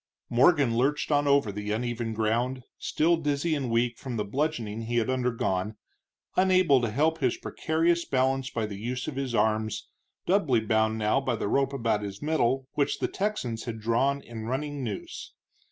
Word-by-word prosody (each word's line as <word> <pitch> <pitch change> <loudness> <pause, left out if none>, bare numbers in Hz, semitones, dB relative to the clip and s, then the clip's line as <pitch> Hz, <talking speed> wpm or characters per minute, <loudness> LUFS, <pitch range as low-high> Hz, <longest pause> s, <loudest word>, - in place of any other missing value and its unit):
Morgan 130 -1 +4
lurched 140 +6 +1
on 145 0 +3
over 140 -7 +3
the 105 +1 -5
uneven 120 +1 -2
ground, 120 +4 0 0.2
still 170 +2 +2
dizzy 150 +1 0
and 140 -5 -1
weak 115 0 +1
from 125 -3 -5
the 105 - -1
bludgeoning 115 -3 -2
he 120 - -2
had 115 +2 +1
undergone, 115 -6 -1 0.6
unable 185 -7 +4
to 120 - 0
help 155 +8 +1
his 130 -4 +1
precarious 170 +2 0
balance 130 -1 0
by 115 -2 -2
the 100 -2 -6
use 125 +3 -3
of 150 - -4
his 135 -3 -2
arms, 110 -1 0 0.4
doubly 165 - +3
bound 110 0 +1
now 110 +5 +2
by 130 -3 -1
the 105 - -3
rope 135 +5 +1
about 115 -6 0
his 100 -1 -6
middle 135 -4 0
which 140 - 0
the - - -1
Texans 190 - -3
had 115 -2 -5
drawn 125 +6 +1
in 110 -2 -7
running 140 +3 -3
noose. 105 -5 -6
125 Hz, 175 wpm, -27 LUFS, 110-145 Hz, 0.6 s, Morgan